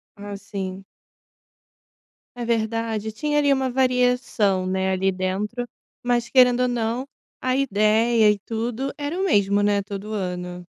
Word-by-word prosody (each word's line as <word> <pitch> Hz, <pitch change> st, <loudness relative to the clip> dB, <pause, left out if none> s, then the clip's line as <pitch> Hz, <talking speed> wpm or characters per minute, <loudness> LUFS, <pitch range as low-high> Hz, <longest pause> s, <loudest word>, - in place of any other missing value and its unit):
Ah, 205 Hz, 0 st, -7 dB
sim. 195 Hz, -2 st, -6 dB, 1.5 s
É 240 Hz, -1 st, -4 dB
verdade. 225 Hz, -1 st, -1 dB
Tinha 295 Hz, +6 st, -1 dB
ali 285 Hz, -1 st, +3 dB
uma 265 Hz, -1 st, +1 dB
variação, 250 Hz, -6 st, +1 dB
né, 190 Hz, 0 st, 0 dB
ali 190 Hz, +1 st, +1 dB
dentro, 200 Hz, +6 st, -3 dB, 0.3 s
mas, 240 Hz, -1 st, 0 dB
querendo 250 Hz, -1 st, +5 dB
ou 250 Hz, -, +3 dB
não, 240 Hz, +1 st, -1 dB, 0.4 s
a 255 Hz, 0 st, +1 dB
ideia 220 Hz, -2 st, +3 dB
e 205 Hz, -, -2 dB
tudo 230 Hz, +5 st, -3 dB
era 295 Hz, +4 st, -3 dB
o 385 Hz, -, +1 dB
mesmo, 205 Hz, -, +3 dB
né, 205 Hz, 0 st, +2 dB
todo 200 Hz, +2 st, -6 dB
ano. 180 Hz, -2 st, -4 dB
220 Hz, 140 wpm, -23 LUFS, 200-250 Hz, 1.5 s, querendo